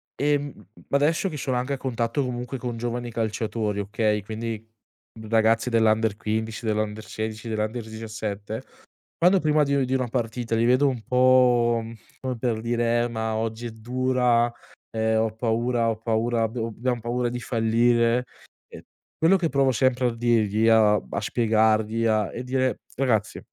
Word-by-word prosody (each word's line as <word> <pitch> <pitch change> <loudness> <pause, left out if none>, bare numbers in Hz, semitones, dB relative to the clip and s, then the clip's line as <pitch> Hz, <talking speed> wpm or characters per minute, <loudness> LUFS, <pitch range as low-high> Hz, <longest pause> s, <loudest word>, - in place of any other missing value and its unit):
ehm, 145 -6 -1 0.2
adesso 155 +7 +2
che 150 - -6
sono 130 -2 -2
anche 125 +3 -1
a - - -2
contatto 125 +1 -1
comunque, 125 +1 -4
con 120 -2 -4
giovani 120 +1 -3
calciatori, 110 -2 -2
okay, 105 +1 0
quindi 110 +1 -5 0.6
ragazzi 115 +1 +3
dell'under 110 -2 +2
15, 110 +2 -3
dell'under 110 0 -1
16, 110 +1 -5
dell'under 110 +1 -2
17 110 0 -5 0.6
quando 180 +2 +4
prima 150 -1 +3
di 140 -2 +1
di 130 - -1
una 130 -2 0
partita, 115 -1 -2
li 115 +1 +2
vedo 130 +4 +4
un 130 -3 -3
po', 125 -2 +4 0.4
come 130 -1 -3
per 115 -2 -1
dire: 120 0 +1
"Eh - - -1
ma 110 -1 -3
oggi 110 +1 -3
è - - -4
dura, 120 +1 +1 0.4
ehm, 110 0 +1
ho 110 - 0
paura 115 +1 0
ho 115 - 0
paura 115 +1 0
abbiamo 115 +1 -2
abbiam 120 +2 -2
paura 120 +1 -1
di 125 0 -4
fallire" 115 +1 +2 0.4
ehm, - - -11 0.4
quello 165 +4 +5
che 175 -3 0
provo 135 -1 +2
sempre 130 0 +2
a 120 - -3
dirgli 115 -2 +2
a 110 -2 +5
a 100 -1 -3
spiegargli 110 0 +1
a 110 -3 +1
e 120 - -5
dire: 130 0 0 0.2
"Ragazzi, 110 -5 0
115 Hz, 160 wpm, -25 LUFS, 110-125 Hz, 0.6 s, quello